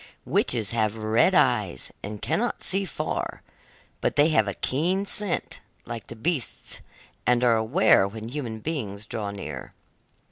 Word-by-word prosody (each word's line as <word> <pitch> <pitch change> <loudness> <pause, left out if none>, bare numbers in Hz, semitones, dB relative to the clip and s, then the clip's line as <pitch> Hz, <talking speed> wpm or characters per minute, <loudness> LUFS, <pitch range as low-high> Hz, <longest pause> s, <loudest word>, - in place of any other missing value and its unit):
Witches 110 -5 +1
have 110 -2 +1
red 110 +1 +3
eyes, 65 - +2
and 105 +1 -6
cannot 240 +2 0
see 195 +1 +2
far, 170 - -3 0.6
but - - +1
they 145 +2 +5
have 110 -9 +3
a 100 - -2
keen 180 +9 0
scent 200 -2 -1 0.3
like 115 -1 -6
the 115 - -8
beasts, 140 +2 -2 0.5
and 125 0 +4
are 120 -2 +5
aware 110 - +4
when 110 +2 -7
human 120 -4 -4
beings 105 -10 -3
draw 105 -1 -4
near. 75 -10 -7
115 Hz, 145 wpm, -26 LUFS, 105-150 Hz, 0.6 s, they